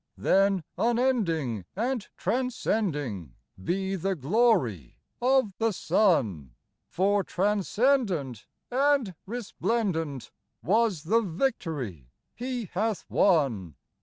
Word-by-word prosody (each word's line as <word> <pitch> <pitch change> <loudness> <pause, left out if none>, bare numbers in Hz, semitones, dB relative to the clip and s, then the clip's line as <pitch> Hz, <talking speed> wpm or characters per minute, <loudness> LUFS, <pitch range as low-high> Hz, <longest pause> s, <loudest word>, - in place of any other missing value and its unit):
Mi - - -14
Then, 195 -2 +3 0.2
unending 210 - +1
and 235 +2 -1
transcending 155 - -2 0.3
Be 190 - -1
the 190 +1 -1
glory 150 - +1 0.2
of 255 -5 +3
the 225 0 +2
Son: 160 - +1 0.3
For 200 +2 +1
transcendent 200 - 0 0.2
and 270 -5 +2
resplendent 195 - -2 0.3
Was 210 -5 +2
the 220 +8 +3
victory 160 - -3 0.2
he 245 -1 -4
hath 210 0 -1
won. 125 - +2
195 Hz, 90 wpm, -27 LUFS, 150-230 Hz, 0.3 s, Then